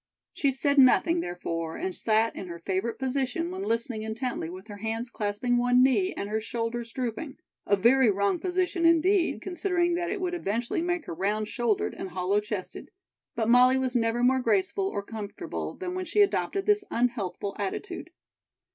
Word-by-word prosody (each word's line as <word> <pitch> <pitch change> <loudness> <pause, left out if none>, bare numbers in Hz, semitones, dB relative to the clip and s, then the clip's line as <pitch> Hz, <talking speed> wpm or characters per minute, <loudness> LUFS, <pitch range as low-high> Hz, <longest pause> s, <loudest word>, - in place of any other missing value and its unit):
She 280 - +1
said 280 +2 +2
nothing, 330 +6 +5
therefore, 165 - -4
and 370 +1 -3
sat 220 +1 +1
in 190 - -6
her 170 -1 -7
favorite 190 +6 -2
position 270 +5 -1
when 375 +1 -5
listening 230 - -1
intently 220 -4 -3
with 185 +3 -9
her 205 -2 -9
hands 225 +3 -3
clasping 215 +4 0
one 245 +1 +4
knee 370 +9 +3
and 200 - -4
her 215 +1 -1
shoulders 230 +1 -3
drooping; 260 +4 -4 0.3
a 200 - +5
very 235 +5 +5
wrong 200 -1 +1
position 360 -1 -1
indeed, 335 +3 +3
considering 355 -1 0
that 345 0 -1
it 400 +1 -2
would 365 -1 -2
eventually 235 - -1
make 350 -1 -1
her - - -5
round 210 +5 -1
shouldered 235 -4 0
and 190 - -6
hollow 185 +3 +1
chested; 210 -3 -6 0.5
but 225 -2 0
Molly 250 +2 +6
was 260 -1 -1
never 230 0 +1
more 260 +1 +4
graceful 230 - +1
or 200 - -3
comfortable 210 -1 -6
than 365 -1 -5
when 370 0 -3
she 415 - +2
adopted 395 -1 +1
this 415 -1 +3
unhealthful 220 -5 -1
attitude. 350 - -4
240 Hz, 175 wpm, -27 LUFS, 210-335 Hz, 0.5 s, Molly